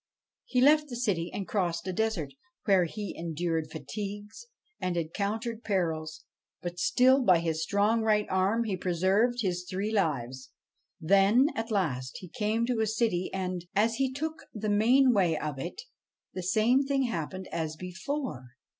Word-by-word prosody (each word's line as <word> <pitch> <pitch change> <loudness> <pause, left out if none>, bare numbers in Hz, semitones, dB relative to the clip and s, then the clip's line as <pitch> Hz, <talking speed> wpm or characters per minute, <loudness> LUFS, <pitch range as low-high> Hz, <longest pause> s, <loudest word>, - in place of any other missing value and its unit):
He 250 - +1
left 300 +2 +5
the 245 - -5
city 195 -8 -1
and 195 - -5
crossed 175 -5 -1
a 185 - -3
desert, 185 -9 -1 0.3
where 190 -4 +4
he 205 +4 -5
endured 165 -1 -2
fatigues 205 - -7 0.3
and 180 -1 -2
encountered 215 +7 -3
perils; 160 -6 -2 0.3
but 175 0 -6
still, 260 +4 +4
by 185 -8 +5
his 165 -1 -1
strong 205 +6 +2
right 210 -1 +2
arm, 195 +5 +1
he 210 -4 -2
pre 180 -1 -2
served 215 +7 +2
his 180 -2 -2
three 200 +3 -2
lives. 130 - -1 0.5
Then, 200 - +4
at 225 +1 -4
last, 140 - -1
he 185 - -10
came 215 +6 0
to 245 -2 -1
a 220 - +2
city; 220 -5 0
and, 185 -2 -3
as 225 +3 +2
he 265 -1 +1
took 315 +4 -5
the 215 0 -2
mainway 215 - +4
of 150 -3 -4
it, 405 - -6 0.5
the 185 - -4
same 215 +8 +3
thing 275 -1 +1
happened 185 -4 -4
as 160 -2 -3
before. 180 - -5
200 Hz, 160 wpm, -29 LUFS, 170-230 Hz, 0.5 s, left